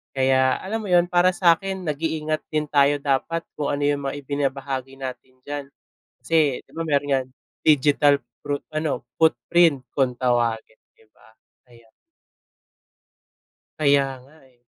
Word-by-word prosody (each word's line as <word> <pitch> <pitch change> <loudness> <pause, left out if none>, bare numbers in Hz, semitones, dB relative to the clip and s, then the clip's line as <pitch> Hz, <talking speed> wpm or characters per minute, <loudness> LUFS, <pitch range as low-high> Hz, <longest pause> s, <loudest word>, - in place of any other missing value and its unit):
Kaya 130 -1 +3
alam 215 +4 -3
mo - - -5
'yun, 175 -2 +4
para 180 +1 +3
sa 175 -5 +5
akin 190 -1 -5
nag-iingat 155 0 -2
din 155 -1 -1
tayo 145 0 +4
dapat 150 +4 0 0.2
kung 145 - -1
ano 145 0 -1
'yung 145 0 +1
mga 135 - -3
ibinabahagi 135 -1 -3
natin 130 -1 -8
diyan 145 0 -5 0.6
kasi 155 -5 +2
di - - -27
ba, 165 - -1
meron 145 -1 +1
niyan 130 -2 +1 0.4
digital 145 -1 +4 0.3
pro 145 0 -1 0.2
ano 155 -5 -1 0.2
footprint 160 -2 +3
kung 130 -3 +1
tawagin 120 -3 0 0.2
di 110 - -25
ba, 110 - -23 0.3
kaya 115 -2 -20 1.9
Kaya 140 -2 +4 0.2
nga, 140 +5 -20
eh. 120 -1 -32
145 Hz, 140 wpm, -23 LUFS, 130-155 Hz, 1.9 s, sa